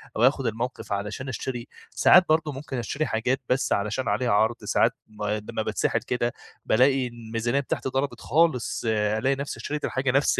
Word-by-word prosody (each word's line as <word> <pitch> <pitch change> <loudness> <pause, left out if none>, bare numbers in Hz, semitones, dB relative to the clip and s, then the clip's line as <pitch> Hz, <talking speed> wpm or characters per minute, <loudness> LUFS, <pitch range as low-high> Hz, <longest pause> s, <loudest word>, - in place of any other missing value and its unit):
أو 110 - +1
آخد 135 +1 +3
الموقف 115 +2 -4
علشان 105 +6 -4
أشتري، 120 0 -4 0.2
ساعات 180 0 +6
برضو 155 -1 +2
ممكن 135 -1 -6
أشتري 140 +6 -2
حاجات 125 +3 0
بس 130 +2 +2
علشان 105 +5 -1
عليها 115 +4 +1
عرض، 110 +3 +3
ساعات - - +3 0.2
م 105 -1 -9
لمّا 105 0 -2
باتسحل - - 0
كده 120 -1 -1 0.3
بالاقي 130 +2 +3
الميزانية 120 +2 -2
بتاعتي 135 -1 -2
ضربت 130 -3 -2
خالص، 135 - +1
ألاقي 110 +4 +1
نفس 140 +1 -5
اشتريت 150 0 -3
الحاجة 130 0 0
نفس 140 +3 +2
125 Hz, 165 wpm, -25 LUFS, 110-135 Hz, 0.3 s, ساعات